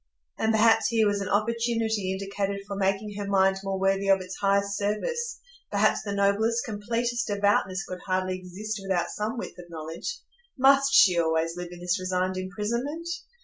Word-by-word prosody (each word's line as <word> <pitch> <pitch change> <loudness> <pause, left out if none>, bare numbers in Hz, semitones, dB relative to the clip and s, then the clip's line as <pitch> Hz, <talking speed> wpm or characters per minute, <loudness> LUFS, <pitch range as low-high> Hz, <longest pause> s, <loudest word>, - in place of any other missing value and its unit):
And 220 - +2
perhaps 225 +1 +4
here 225 -2 +2
was 205 -1 +1
an 195 - -3
opportunity 225 -2 0
indicated 195 +1 -3
for 200 - -5
making 195 +2 0
her 200 - -3
mind 195 -1 +3
more 195 -1 -3
worthy 195 +1 +1
of 195 0 +5
its 185 0 -7
highest 200 0 +1
service; 475 - -2 0.3
perhaps - - +2
the 205 - -5
noblest, 200 +4 +1
completest 235 +3 -2
devoutness 200 -2 +1
could 185 0 -6
hardly 185 0 0
exist 200 +4 -6
without 185 -3 -1
some 215 +3 -3
width 180 - -6
of 175 -1 -11
knowledge; 165 - -5 0.4
must 275 +1 +5
she 185 -9 +6
always 165 0 +1
live 175 -1 -6
in 175 0 -10
this 180 +2 0
resigned 185 0 -1
imprisonment? 235 - -3
200 Hz, 170 wpm, -27 LUFS, 185-220 Hz, 0.4 s, she